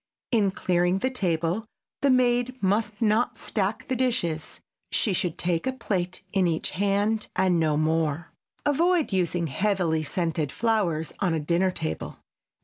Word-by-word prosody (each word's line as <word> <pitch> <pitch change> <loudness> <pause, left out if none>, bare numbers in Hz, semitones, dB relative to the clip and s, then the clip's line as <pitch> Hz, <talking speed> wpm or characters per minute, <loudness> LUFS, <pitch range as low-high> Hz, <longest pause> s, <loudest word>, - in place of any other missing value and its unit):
In 215 -5 +3
clearing 180 -1 +1
the 260 +7 -1
table 180 -1 -1 0.3
the 280 - +3
maid 250 0 +2
must 210 +2 0
not 220 +3 +2
stack 215 +5 -2
the 260 - 0
dishes. 175 -11 -1 0.3
She 205 - +1
should 180 -3 -1
take 175 +4 -1
a 260 - 0
plate 185 -7 -2
in 190 -2 +3
each 165 -1 -1
hand 205 +3 +1
and 180 -2 +3
no 155 -2 +2
more. 160 0 0 0.3
Avoid 325 - +2
using 175 -2 +1
heavily 170 +1 0
scented 160 -1 -1
flowers 195 -9 0
on 180 -4 +1
a - - 0
dinner 170 +5 +1
table. 80 - -4
190 Hz, 145 wpm, -26 LUFS, 165-225 Hz, 0.3 s, In